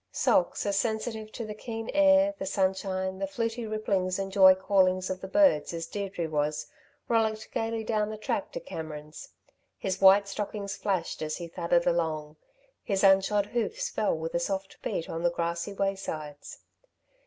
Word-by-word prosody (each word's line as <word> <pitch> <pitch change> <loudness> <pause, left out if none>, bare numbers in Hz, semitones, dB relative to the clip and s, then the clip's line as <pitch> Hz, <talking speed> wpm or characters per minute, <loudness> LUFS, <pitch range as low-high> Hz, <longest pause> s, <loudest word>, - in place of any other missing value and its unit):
Socks, - - +2
as 200 -1 +1
sensitive 220 0 -2
to 230 - -5
the 215 - -5
keen 225 +1 -6
air, 290 0 +5
the 195 - -3
sunshine, 190 -1 -1
the 195 - -1
fluty 230 +3 -3
ripplings 195 -4 -1
and 195 0 -3
joy 190 -1 +8
callings 185 -1 +2
of 185 0 -4
the 190 - -5
birds 190 - +3
as 165 0 -4
Deirdre 195 -5 -4
was, 150 -1 -1 0.4
rollicked 220 -2 0
gaily 225 0 -2
down 215 -1 0
the 215 - -5
track 215 - -2
to - - -3
Cameron's. 155 - -8 0.5
His 190 -1 -3
white 195 +1 +7
stockings 200 0 -4
flashed 195 -4 -2
as 155 0 -2
he 170 - -6
thudded 170 +1 +1
along; 155 -3 -1 0.4
his 195 -2 -1
unshod 195 +1 +4
hoofs 225 0 -2
fell 210 -6 0
with 160 +1 -5
a 170 - +1
soft 190 +2 -4
beat 165 - -3
on 165 - -4
the 175 - +3
grassy 170 +2 -2
waysides. 160 -7 -4
195 Hz, 165 wpm, -28 LUFS, 170-215 Hz, 0.5 s, joy